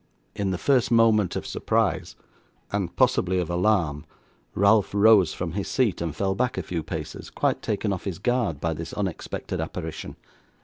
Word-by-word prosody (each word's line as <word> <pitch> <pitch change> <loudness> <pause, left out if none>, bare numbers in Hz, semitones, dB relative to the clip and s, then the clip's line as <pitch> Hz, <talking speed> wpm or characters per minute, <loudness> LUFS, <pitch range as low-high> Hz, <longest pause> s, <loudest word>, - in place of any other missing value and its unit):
In 100 -2 -1
the 95 - -1
first 130 +3 +2
moment 115 -4 +4
of - - -3
surprise, - - -1 0.6
and 95 -4 -2
possibly 95 0 +2
of 90 -1 -1
alarm, 85 -5 +1 0.5
Ralph 100 +1 +3
rose 105 -3 +6
from 90 -2 -3
his 100 +3 -3
seat, 115 -10 +1
and 80 -3 -3
fell 95 -1 0
back 125 +5 -1
a - - -2
few 85 -2 -3
paces, 80 -1 -6
quite - - 0
taken 105 -1 -1
off 95 - -6
his 95 -4 -3
guard 115 - 0
by 80 +2 -1
this 80 +1 -7
unexpected 95 -5 -4
apparition. - - -6
95 Hz, 170 wpm, -25 LUFS, 85-110 Hz, 0.6 s, rose